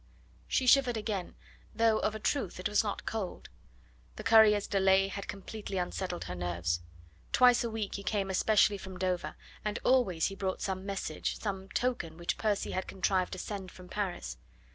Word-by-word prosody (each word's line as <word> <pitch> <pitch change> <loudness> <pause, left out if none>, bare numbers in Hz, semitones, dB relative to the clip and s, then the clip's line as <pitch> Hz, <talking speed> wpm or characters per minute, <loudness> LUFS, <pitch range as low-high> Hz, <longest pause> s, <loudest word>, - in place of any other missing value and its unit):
She 260 - +1
shivered 250 -2 +5
again, 210 -4 -3 0.4
though 225 0 +3
of 215 - 0
a - - -4
truth 215 -5 -1
it 185 - 0
was 210 - +3
not 205 -2 -4
cold. 215 -5 -4 0.7
The - - -7
courier's 220 -2 +6
delay 195 0 +3
had 200 0 -6
completely 200 0 -6
unsettled 180 0 -2
her 90 - -5
nerves. 85 -1 -1 0.5
Twice 245 -1 +6
a 235 - -1
week 220 -3 -3
he 200 - -4
came 200 -2 -1
especially 205 +1 +3
from 190 -1 -8
Dover, 180 -1 -1 0.3
and 210 +1 -1
always 205 -11 +3
he 195 - -1
brought 190 -1 -2
some 190 0 -3
message, 195 -6 -3
some 195 -2 -4
token 235 -12 -1
which 170 0 -2
Percy 210 -2 0
had 185 - -2
contrived 190 -1 0
to - - -5
send 190 -1 -5
from 180 -1 -13
Paris. 180 - -3
195 Hz, 175 wpm, -31 LUFS, 185-215 Hz, 0.7 s, courier's